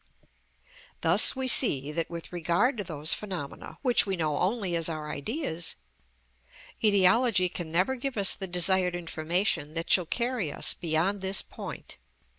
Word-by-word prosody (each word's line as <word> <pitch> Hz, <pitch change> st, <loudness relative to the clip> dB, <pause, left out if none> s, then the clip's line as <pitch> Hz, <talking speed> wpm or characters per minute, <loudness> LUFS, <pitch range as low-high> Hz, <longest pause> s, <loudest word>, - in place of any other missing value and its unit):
Thus 175 Hz, +11 st, +5 dB
we 260 Hz, 0 st, -3 dB
see 150 Hz, -, +6 dB
that, 165 Hz, +1 st, -3 dB
with 170 Hz, +1 st, -9 dB
regard 175 Hz, +10 st, 0 dB
to -, -, -2 dB
those 155 Hz, -3 st, -1 dB
phenomena 185 Hz, -9 st, -7 dB
which 245 Hz, -5 st, +3 dB
we 195 Hz, -, -2 dB
know 155 Hz, -4 st, -2 dB
only 190 Hz, -2 st, -1 dB
as 165 Hz, 0 st, -1 dB
our 155 Hz, -2 st, -6 dB
ideas, 175 Hz, -, -3 dB, 1.1 s
etiology 200 Hz, -1 st, +3 dB
can 170 Hz, -2 st, -7 dB
never 185 Hz, +10 st, +1 dB
give 260 Hz, -1 st, -6 dB
us 200 Hz, -1 st, +6 dB
the 190 Hz, -, -6 dB
desired 180 Hz, 0 st, +2 dB
information 165 Hz, -1 st, -2 dB
that 165 Hz, 0 st, -4 dB
shall 180 Hz, -3 st, +3 dB
carry 235 Hz, -, -2 dB
us -, -, +1 dB
beyond 175 Hz, +4 st, -2 dB
this 190 Hz, +1 st, +3 dB
point. -, -, -9 dB
180 Hz, 150 wpm, -27 LUFS, 165-205 Hz, 1.1 s, see